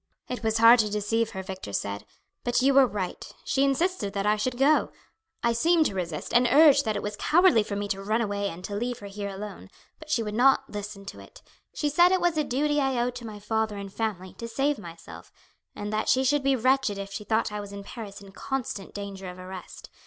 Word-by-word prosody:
"It 250 - -5
was 220 -1 +1
hard 230 +2 +8
to 215 -1 +2
deceive 210 +2 0
her," 190 -3 -6
Victor 190 - -7
said; 100 +1 -3 0.4
"but 245 0 +1
you 275 +2 +4
were 270 -1 +6
right. 195 -5 -5
She 275 - +1
insisted 275 - 0
that 200 -1 -2
I 210 0 +4
should 240 +4 -2
go. 285 +4 +3 0.5
I 235 0 +3
seemed 325 +6 +3
to - - 0
resist, 170 -5 -4
and 245 +1 +5
urged 285 -2 +6
that 215 -1 0
it - - -3
was 210 0 -3
cowardly 330 - +4
for 205 -1 -4
me 205 0 -2
to 195 -1 -2
run 215 +3 0
away 200 -3 -1
and 175 +1 -9
to 205 - -6
leave 240 +4 -2
her 205 - -11
here 200 0 -5
alone, 195 - -8 0.3
but 315 - -13
she 255 -7 +1
would 210 -1 -4
not 270 +3 +4
listen 205 -1 -7
to - - -9
it. - - -15 0.3
She 300 - -1
said 345 +5 +5
it 375 - +3
was 350 -1 +1
a 305 - +1
duty 295 +3 0
I 265 -2 0
owed 245 +1 0
to 245 -2 -8
my 215 -1 -8
father 220 0 -1
and 200 -1 -7
family 195 -5 -3
to 230 - -5
save 275 +4 0
myself, 170 -4 -11 0.4
and 205 +1 -5
that 215 - 0
she 260 - +4
should 290 +2 +2
be 275 0 +2
wretched 255 -3 +2
if 200 0 -6
she 210 - -5
thought 220 +1 0
I 210 0 -4
was 200 -1 -9
in 200 0 -7
Paris 205 -2 -9
in 195 -1 -13
constant 240 -3 -5
danger 200 -2 -6
of 180 - -10
arrest. 185 0 -10
220 Hz, 240 wpm, -27 LUFS, 200-265 Hz, 0.5 s, hard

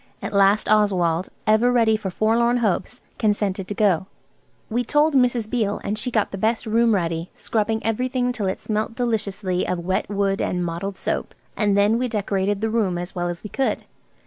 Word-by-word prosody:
At - - -5
last 200 +1 +4
Oswald, 185 -5 +2 0.2
ever 220 +3 +4
ready 230 -3 +3
for 210 -3 -3
forlorn 230 +5 +2
hopes, 205 -6 -1 0.2
consented 205 -3 0
to 205 - -4
go. 190 -4 +2 0.6
We 240 +2 -1
told 295 +4 +2
Mrs. 245 -4 +2
Beale, 215 -3 -1
and 205 - -2
she 215 +4 -2
got 220 -4 0
the 195 - -5
best 225 +4 0
room 230 0 +3
ready, 170 -2 -2
scrubbing 220 0 -1
everything 250 +2 0
till 215 -5 -2
it 190 - -2
smelt 215 +1 -2
deliciously 205 -6 -1
of 180 - -1
wet 185 +1 -1
wood 200 -1 0
and 180 -1 -1
mottled 175 +4 -4
soap. - - -3 0.2
And 205 -2 +2
then 210 +3 +3
we 250 - 0
decorated 200 -2 -1
the 220 - 0
room 205 -6 +1
as 175 +1 -5
well 175 -1 -2
as 175 -1 -6
we 210 - -6
could. 270 0 -1
210 Hz, 190 wpm, -23 LUFS, 190-230 Hz, 0.6 s, last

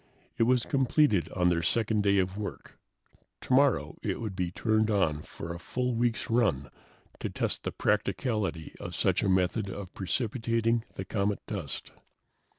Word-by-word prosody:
It - - +2
was 125 -2 +3
completed 135 - +2
on 90 -1 +3
their 85 -1 +1
second 110 +4 +1
day 100 -1 +3
of 95 0 +1
work. 105 0 -7 0.6
Tomorrow 130 - +2
it - - -2
would 110 -4 -4
be 90 -2 -1
turned 110 +4 +1
on 90 -8 +2
for 85 +2 -7
a 85 - -7
full 125 +6 -2
week's 120 0 0
run 100 - +1 0.5
to - - -3
test - - -2
the - - -2
practicability 100 - -1
of - - -6
such - - +2
a - - +1
method 95 +3 +1
of 95 -1 -7
precipitating 115 +3 0
the 95 - -5
comet 100 0 -1
dust. 95 -10 -5
105 Hz, 155 wpm, -29 LUFS, 90-115 Hz, 0.6 s, was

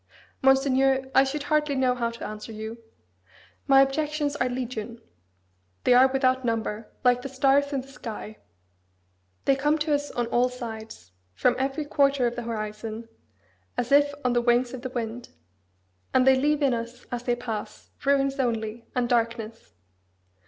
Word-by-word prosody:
Monseigneur, 270 0 +3
I 265 - +6
should 280 +2 -3
hardly 300 -1 +1
know 260 -1 +2
how 235 -2 -1
to 235 0 -8
answer 215 +1 -7
you. 220 +1 -7 0.9
My 270 -1 +7
objections 295 +1 -1
are 255 - +1
'Legion!' 240 -2 -5 0.8
They 250 - +5
are 255 +2 +7
without 260 -1 +1
number, 225 -2 -2
like 250 -1 +4
the 275 - -6
stars 275 +2 +2
in 275 -2 -1
the 260 - -15
sky: 225 -5 -8 1.1
they 275 - +4
come 295 +3 +1
to 305 0 0
us 290 0 0
on 240 - -2
all 245 +1 +3
sides, 220 - -8 0.2
from 250 - +2
every 270 +3 -1
quarter 280 -3 +2
of 240 0 -1
the 240 - -4
horizon, 215 +1 -5 0.7
as 245 - -2
if 285 0 +5
on 250 - +3
the 240 - +2
wings 240 +1 +2
of 255 - -6
the 255 - -4
wind; 240 -1 -5 0.9
and 255 0 +5
they 265 0 +7
leave 295 +3 +1
in 270 -3 +3
us, 235 +1 -5
as 245 -1 -3
they 245 -1 0
pass, 220 -3 -6
ruins 275 0 +2
only, 230 -2 -2
and 250 -1 +1
darkness. 230 -1 -2
250 Hz, 165 wpm, -26 LUFS, 230-270 Hz, 1.1 s, My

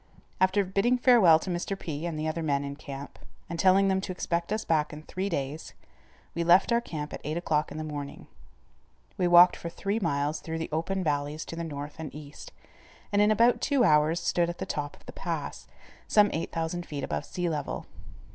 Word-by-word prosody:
After 190 +2 +3
bidding 200 +7 +2
farewell 235 -10 +6
to 180 +3 -5
Mr. 175 +3 -2
P. 160 -2 -4
and 165 -2 -4
the 155 +1 -2
other 155 +1 -2
men 140 -3 0
in 140 0 -5
camp, 140 -1 -9 0.3
and 170 0 -5
telling 195 +2 +5
them 190 0 +1
to 190 - -4
expect 170 0 -2
us 215 +1 -1
back 155 -2 +1
in 150 0 -9
three 190 +4 -3
days, 145 -2 -4 0.6
we 170 - -1
left 175 +6 +5
our 235 0 +3
camp 150 -9 -6
at - - -6
eight 155 +3 -3
o'clock 155 -4 0
in 150 - -6
the 155 - -3
morning. 145 -2 -6 0.9
We 180 - +1
walked 175 +1 +8
for 170 - -6
three 200 +5 -2
miles 150 -4 -1
through 160 0 -5
the 160 - -4
open 185 +5 -1
valleys 145 0 -2
to - - -7
the 170 - -4
north 145 -2 -6
and 155 -3 -5
east, 145 -1 -10 0.6
and 205 0 +3
in 210 - +5
about 230 +3 +4
two 280 -4 +2
hours 155 -2 +4
stood 170 0 +1
at 175 - -5
the - - -4
top 145 -1 -4
of - - -25
the - - -10
pass, - - -5 0.4
some 205 -1 +4
8000 165 +2 -3
feet 145 -2 -5
above 75 -1 -2
sea 180 -1 -3
level. 155 -3 -3
165 Hz, 210 wpm, -28 LUFS, 150-190 Hz, 0.9 s, walked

